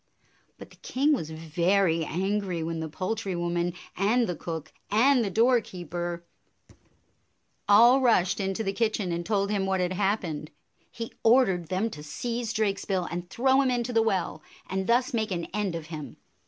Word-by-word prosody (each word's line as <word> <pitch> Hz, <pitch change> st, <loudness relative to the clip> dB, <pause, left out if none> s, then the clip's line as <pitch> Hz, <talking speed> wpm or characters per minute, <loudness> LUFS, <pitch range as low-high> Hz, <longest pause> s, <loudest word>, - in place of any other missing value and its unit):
But -, -, -12 dB
the -, -, -18 dB
king 280 Hz, +4 st, +1 dB
was 160 Hz, -, -2 dB
very 165 Hz, +2 st, +1 dB
angry 190 Hz, 0 st, -1 dB
when 165 Hz, 0 st, -3 dB
the 160 Hz, 0 st, -4 dB
poul 185 Hz, +7 st, -2 dB
try 205 Hz, -4 st, -4 dB
woman 175 Hz, 0 st, -1 dB, 0.2 s
and 220 Hz, +6 st, +2 dB
the 180 Hz, -, -3 dB
cook 160 Hz, -2 st, -6 dB, 0.2 s
and 245 Hz, +4 st, +4 dB
the 205 Hz, -, -1 dB
doorkeeper 180 Hz, -, 0 dB, 1.4 s
all 235 Hz, +6 st, +7 dB
rushed 200 Hz, -6 st, +3 dB
into 195 Hz, +2 st, -1 dB
the 195 Hz, -1 st, -1 dB
kitchen 215 Hz, -4 st, 0 dB
and 170 Hz, 0 st, -2 dB
told 200 Hz, +1 st, 0 dB
him 195 Hz, -2 st, 0 dB
what 190 Hz, -1 st, +1 dB
had 180 Hz, 0 st, 0 dB
happened. 185 Hz, -6 st, -1 dB, 0.4 s
He 230 Hz, -1 st, -7 dB
ordered 225 Hz, -8 st, +4 dB
them 195 Hz, +6 st, -1 dB
to 150 Hz, -, -8 dB
seize 235 Hz, +9 st, -4 dB
Drakesbill 200 Hz, -4 st, -1 dB
and 175 Hz, 0 st, -5 dB
throw 265 Hz, +6 st, +3 dB
him 265 Hz, -, +2 dB
into 245 Hz, 0 st, -1 dB
the 225 Hz, -, +4 dB
well, 190 Hz, -7 st, -1 dB, 0.3 s
and 190 Hz, 0 st, -2 dB
thus 245 Hz, +2 st, +2 dB
make 220 Hz, -2 st, 0 dB
an 170 Hz, -3 st, -2 dB
end 205 Hz, -4 st, -1 dB
of 165 Hz, -2 st, -5 dB
him. 150 Hz, -2 st, -7 dB
195 Hz, 170 wpm, -27 LUFS, 175-225 Hz, 1.4 s, all